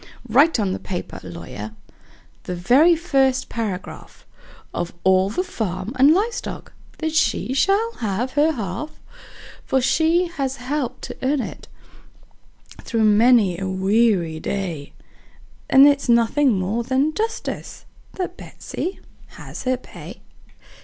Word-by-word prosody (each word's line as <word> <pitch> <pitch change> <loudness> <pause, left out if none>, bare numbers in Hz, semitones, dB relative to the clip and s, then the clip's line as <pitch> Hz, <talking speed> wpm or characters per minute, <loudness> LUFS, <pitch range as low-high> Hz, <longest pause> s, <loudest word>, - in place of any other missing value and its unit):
Write 275 +5 +4
on 200 -3 0
the - - -4
paper, 180 -2 -6
lawyer 90 +5 -8 0.7
the 180 - -3
very 265 - +5
first 270 -6 +1
paragraph 210 -6 -6 0.5
Of 175 0 -3
all 190 0 +4
the 360 - -1
farm 215 - -4
and 270 +3 +6
live 420 +8 +2
stock - - -7 0.2
that 315 -1 -2
she 255 -4 +1
shall 400 +11 +2
have 225 +3 -2
her 295 +3 +2
half; 225 +5 -5 0.6
For 265 - +1
she 320 +7 +2
has 275 -6 -3
helped 265 0 -4
to - - -7
earn 275 +2 +1
it, - - -8 1.1
through 225 -2 -1
many 215 -3 +4
a 190 -1 -3
weary 190 -4 +1
day, 170 -6 -4 0.8
And 270 +1 +8
it's 280 -3 +2
nothing 235 +3 +4
more 200 +6 -1
than 265 +5 +1
justice 445 +3 -4 0.3
that 365 -1 -4
Betsey 370 - -6 0.3
has - - -9
her 255 0 +1
pay. 255 - -12
250 Hz, 130 wpm, -22 LUFS, 195-295 Hz, 1.1 s, And